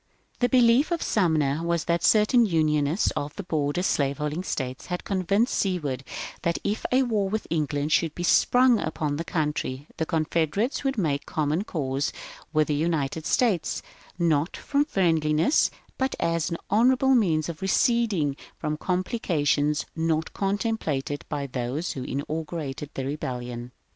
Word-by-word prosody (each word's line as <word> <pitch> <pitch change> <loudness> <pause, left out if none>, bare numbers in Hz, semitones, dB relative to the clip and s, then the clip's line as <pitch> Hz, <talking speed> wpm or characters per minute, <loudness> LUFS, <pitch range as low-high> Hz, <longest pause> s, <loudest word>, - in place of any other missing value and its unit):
^^ - - -36
The 245 - +2
belief 245 +4 +5
of 345 -2 -1
Sumner 160 -7 +1
was 170 -1 -1
that 170 0 0
certain 220 +3 +5
Unionists 155 0 +2
of 145 +1 -4
the 200 - -5
border 155 0 -1
slaveholding 150 0 0
States 130 -7 -4
had 180 -1 -3
convinced 200 +4 +1
Seward 150 -9 -1 0.4
that 170 0 0
if 210 +2 -1
a 260 +1 +4
war 215 -6 0
with 215 +2 -2
England 150 -2 -1
should 165 -2 +2
be 175 - -4
sprung 245 +5 +4
upon 150 -2 -2
the 165 - -2
country 150 -4 -2
the 160 - -1
Confederates 165 - 0
would 270 -2 -1
make 145 -7 -1
common 155 +4 0
cause 140 -5 -2 0.4
with 155 -1 +2
the - - +2
United 155 -1 -1
States, 210 -10 +1 0.3
not 165 -2 +1
from 290 0 +1
friendliness 165 - +2 0.3
but 265 0 0
as 165 -1 0
an 170 - -3
honourable 255 +5 +4
means 165 - +2
of 165 -2 -6
receding 195 - +2 0.2
from 150 0 -2
complications 155 - 0
not 160 -1 0
contemplated 195 - -1
by 145 -2 -2
those 130 +5 -3
who 135 - -5
inaugurated 150 +1 -4
the 135 - -3
Rebellion. 125 -3 -4
160 Hz, 150 wpm, -26 LUFS, 145-200 Hz, 0.4 s, belief